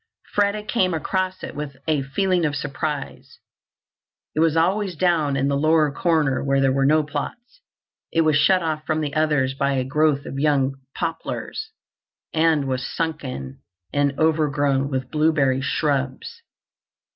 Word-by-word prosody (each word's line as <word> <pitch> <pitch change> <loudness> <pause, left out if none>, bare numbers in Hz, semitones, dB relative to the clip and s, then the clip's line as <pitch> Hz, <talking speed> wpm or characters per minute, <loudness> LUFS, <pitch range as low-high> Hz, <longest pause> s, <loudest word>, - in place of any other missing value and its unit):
Freda 205 +1 +1
came 185 -7 +1
across 185 +4 -2
it - - -6
with 145 -2 -6
a 155 -3 +2
feeling 175 +7 0
of 150 -2 0
surprise. 145 0 -4 1.0
It - - -2
was 160 -1 +3
away 185 +3 +1
down 160 -5 +1
in 135 0 +1
the 140 - +1
lower 155 +1 +3
corner 150 -4 +1
where 135 0 +2
there 135 -1 +3
were 135 0 +2
no 155 +1 +4
plots. 195 - -6 0.5
It 165 - +3
was 155 -2 +3
shut 170 +5 +4
off 155 -1 -2
from 155 0 -1
the 145 -2 -3
others 150 -4 +1
by 140 0 0
a 130 -1 0
growth 145 +1 +1
of 135 - -5
young 140 -2 +2 0.2
poplars 165 - -4 0.6
and 160 -3 +3
was 130 -1 -2
sunken 135 - -4 0.3
and 140 -1 +1
overgrown 145 -3 +1
with 130 -2 -3
blueberry 150 -4 +2
shrubs. 140 - -2
150 Hz, 150 wpm, -23 LUFS, 140-165 Hz, 1.0 s, no